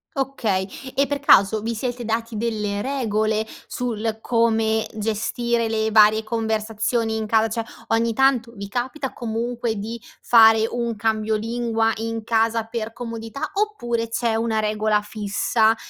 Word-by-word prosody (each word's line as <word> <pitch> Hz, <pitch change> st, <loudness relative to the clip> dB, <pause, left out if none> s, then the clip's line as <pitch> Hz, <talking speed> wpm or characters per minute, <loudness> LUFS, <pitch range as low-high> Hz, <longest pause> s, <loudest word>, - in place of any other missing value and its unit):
Okay, 230 Hz, -9 st, -1 dB, 0.3 s
e 275 Hz, 0 st, +2 dB
per 285 Hz, 0 st, -2 dB
caso, 215 Hz, -6 st, +5 dB
vi 230 Hz, +1 st, -1 dB
siete 245 Hz, +1 st, -4 dB
dati 225 Hz, 0 st, -2 dB
delle 210 Hz, -3 st, -2 dB
regole, 220 Hz, -5 st, 0 dB, 0.2 s
sul, 225 Hz, -2 st, -3 dB
come, 225 Hz, -2 st, +2 dB
gestire 225 Hz, +2 st, -1 dB
le 220 Hz, 0 st, 0 dB
varie 215 Hz, 0 st, +5 dB
conversazioni 220 Hz, 0 st, -1 dB
in 220 Hz, -, -2 dB
casa, 220 Hz, +1 st, +3 dB
cioè, 225 Hz, +1 st, -3 dB, 0.2 s
ogni 230 Hz, 0 st, +1 dB
tanto, 255 Hz, -2 st, +2 dB
vi 200 Hz, -2 st, -7 dB
capita, 255 Hz, +5 st, -3 dB
comunque, 235 Hz, 0 st, -3 dB
di 230 Hz, +3 st, -5 dB, 0.2 s
fare 225 Hz, -1 st, +6 dB
un 235 Hz, -1 st, -2 dB
cambio 220 Hz, 0 st, 0 dB
lingua 225 Hz, 0 st, 0 dB
in 225 Hz, 0 st, -4 dB
casa, 225 Hz, 0 st, +1 dB
per 225 Hz, 0 st, -5 dB
comodità, 230 Hz, +1 st, -5 dB
oppure 240 Hz, -, -1 dB
c'è 230 Hz, -1 st, 0 dB
una 225 Hz, -1 st, 0 dB
regola 215 Hz, 0 st, +1 dB
fissa, 215 Hz, +2 st, +1 dB
225 Hz, 140 wpm, -22 LUFS, 220-235 Hz, 0.3 s, fare